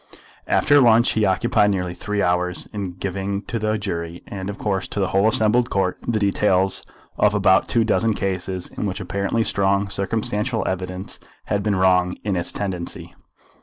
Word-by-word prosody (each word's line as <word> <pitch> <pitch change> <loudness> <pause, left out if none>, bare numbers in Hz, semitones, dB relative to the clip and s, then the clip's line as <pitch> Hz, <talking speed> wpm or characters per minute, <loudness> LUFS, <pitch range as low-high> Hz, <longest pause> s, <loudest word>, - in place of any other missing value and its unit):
After 145 -1 +4
lunch 120 -1 +5
he 110 -1 +1
occupied 105 +3 +2
nearly 90 -3 -1
three 105 +3 -2
hours 90 0 0
in 100 -4 -4
giving 100 +2 -3
to 115 +4 -3
the 110 0 0
jury, 85 -5 -5
and 95 -1 -6
of 100 - -5
course 95 -3 -2
to - - -4
the 95 - +1
whole 100 +2 +3
assembled 110 +2 +3
Court, 95 -2 0
the 115 - +1
details 95 -2 +1 0.4
of - - +3
about - - +4
two 115 - +2
dozen 110 0 +1
cases, 95 -1 -3
in 105 - -4
which 95 +1 -4
apparently 100 +4 -1
strong 100 -1 +1
circumstantial 105 +3 -1
evidence 95 +1 -4 0.3
had 100 - -1
been 105 0 0
wrong 90 -1 +3
in 100 -2 -1
its 85 -1 0
tendency. 95 -4 -5
100 Hz, 170 wpm, -22 LUFS, 95-105 Hz, 0.4 s, lunch